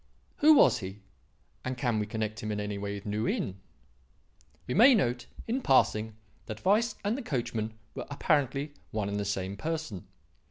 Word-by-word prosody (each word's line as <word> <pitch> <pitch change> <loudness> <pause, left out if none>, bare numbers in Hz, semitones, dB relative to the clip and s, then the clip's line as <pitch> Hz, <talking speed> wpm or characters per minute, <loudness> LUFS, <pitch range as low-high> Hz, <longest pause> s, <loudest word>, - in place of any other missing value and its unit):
Who 310 +1 +7
was - - +6
he? 95 0 -8 0.6
and 130 0 -3
can 120 -4 0
we 105 - -2
connect 110 0 -3
him 110 - -3
in 105 - -2
any 105 -1 -3
way 100 0 -3
with 100 - -8
New 105 +2 -1
Inn? 95 0 -2 1.1
"We 125 - -2
may 250 +5 +8
note 120 - 0 0.2
in 250 +4 0
passing 110 - +3 0.3
that 110 0 -7
Weiss 215 +4 +3
and 210 +3 +1
the 275 - -4
coachman 115 - -2 0.2
were - - -6
apparently 145 0 0 0.2
one 105 -2 -2
and 100 0 -2
the 100 - -2
same 95 0 -2
person. 155 - -4
110 Hz, 175 wpm, -29 LUFS, 105-150 Hz, 1.1 s, may